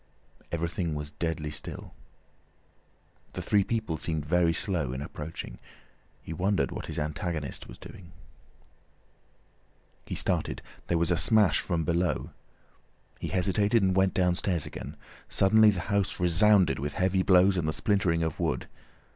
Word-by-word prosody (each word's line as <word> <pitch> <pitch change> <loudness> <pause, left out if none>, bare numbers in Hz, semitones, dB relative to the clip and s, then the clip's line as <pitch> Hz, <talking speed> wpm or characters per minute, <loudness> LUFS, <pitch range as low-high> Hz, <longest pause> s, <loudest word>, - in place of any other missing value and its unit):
Everything 85 -1 -2
was 75 0 -5
deadly 75 0 -3
still. 75 0 -6 1.4
The - - -4
three 100 -1 +3
people 110 -8 -2
seemed 80 -3 -2
very 85 +2 +3
slow 80 -7 -1
in 65 - -5
approaching. 75 +2 -7 0.6
He 80 - -6
wondered 90 -6 0
what - - -6
his - - -5
antagonist 75 -1 -3
was - - -11
doing. 85 -2 -12 2.0
He - - -4
started. - - 0 0.2
There 85 - +1
was 85 +2 +1
a 85 - +2
smash 95 -1 +4
from 85 -3 -1
below. 85 +3 -1 0.9
He - - -4
hesitated 100 +4 +2
and 95 -1 +2
went 95 0 +2
downstairs 90 -2 +1
again. 70 +4 -8 0.3
Suddenly 110 +2 +5
the 95 -4 -1
house 100 -1 -1
resounded 95 +2 +4
with 70 +1 -3
heavy 95 0 +1
blows 95 +1 +5
and 85 -4 -1
the - - +1
splintering 90 -2 +1
of 80 -1 -3
wood. - - -1
85 Hz, 140 wpm, -28 LUFS, 80-95 Hz, 2.0 s, Suddenly